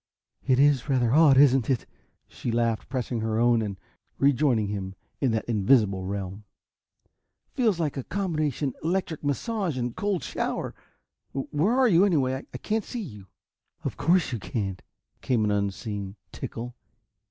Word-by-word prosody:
"It 130 -2 +4
is 140 0 +3
rather 125 -3 +2
odd, 150 -3 +6
isn't 135 -3 +5
it?" 130 -5 +1 0.4
she 120 - -4
laughed, 115 -1 0
pressing 125 -3 -2
her 110 0 -1
own 120 0 +4
and 100 -3 -4 0.6
joining 120 -7 +2
him 95 -2 -4 0.2
in 135 - +2
that 110 -1 -1
invisible 105 -4 +2
realm. 100 +1 -4 1.1
"Feels 220 -9 +1
like 150 -4 -1
a 135 - -3
combination 155 -7 -1
electric 170 -2 -1
massage 175 - -1
and 120 -1 -2
cold 200 -4 -1
shower! - - -3 0.6
Where 150 - 0
are 260 -1 +5
you, 180 -4 +5
anyway? 135 -8 +1
I - - -6
can't 220 0 -1
see 245 - -6
you." 105 - -10 0.6
"Of - - -3
course 175 -3 +2
you 120 - -2
can't!" 100 -4 -3 0.4
came 120 -4 +1
an 105 - +1
unseen 100 0 -2 0.2
tinkle. 120 +1 -6
130 Hz, 150 wpm, -26 LUFS, 110-155 Hz, 1.1 s, odd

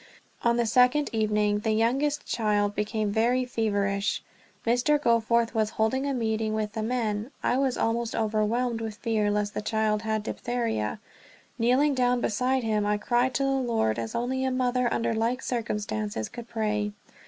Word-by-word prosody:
On 235 0 +3
the 235 - +2
second 250 +6 +3
evening 210 -1 +1
the 220 +1 0
youngest 270 +7 +1
child 205 -2 +1
became 210 0 -1
very 240 +4 +2
feverish. 205 -4 -1 0.4
Mr. 245 +6 +3
Goforth 235 -2 +2
was 220 -2 +1
holding 260 +6 +1
a 280 - 0
meeting 220 -2 -1
with 210 -1 -2
the 220 - -3
men. 220 -1 -1
I 250 - +2
was 265 -2 +1
almost 230 0 0
overwhelmed 225 +2 0
with 220 -2 -4
fear 215 -2 0
lest 205 0 -1
the - - -3
child 215 0 0
had 220 -1 -1
diphtheria. 230 - -2 0.6
Kneeling 255 +5 +3
down 250 -1 +2
beside 250 +3 0
him, 215 -2 +1
I 210 0 +1
cried 245 +4 +1
to 275 - +1
the 275 - +1
Lord 230 - 0
as 115 -1 -4
only 260 +2 -1
a 265 - +1
mother 250 -1 +1
under 230 - 0
like 230 +3 -1
circumstances 210 - -3
could 240 -1 -9
pray. 210 -2 -1
225 Hz, 165 wpm, -27 LUFS, 210-245 Hz, 0.6 s, On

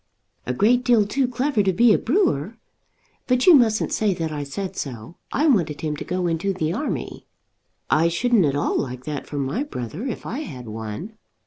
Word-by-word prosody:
"A 125 - 0
great 240 - +3
deal 235 -5 +4
too 260 +5 0
clever 250 -1 0
to 195 -1 +2
be 230 +4 +5
a - - +4
brewer. 230 - 0 0.7
But 250 -1 +2
you 360 - +9
mustn't 235 -6 +3
say 210 -4 +1
that 165 -2 -3
I 145 -1 -3
said 185 +7 -5
so. 125 +2 -6
I 295 - +1
wanted 170 - +2
him 155 -1 -2
to - - -5
go 180 0 -2
into 175 +3 0
the 165 -3 -1
army." 290 +9 -4 0.6
"I 160 +2 +3
shouldn't 205 +3 +2
at 140 -1 0
all 145 - 0
like 125 -1 -4
that 150 -2 -5
for 145 - -6
my 140 - -1
brother 190 - -5
if 245 - -5
I 255 - -4
had 130 - -7
one." 110 - -7
185 Hz, 200 wpm, -23 LUFS, 145-240 Hz, 0.7 s, you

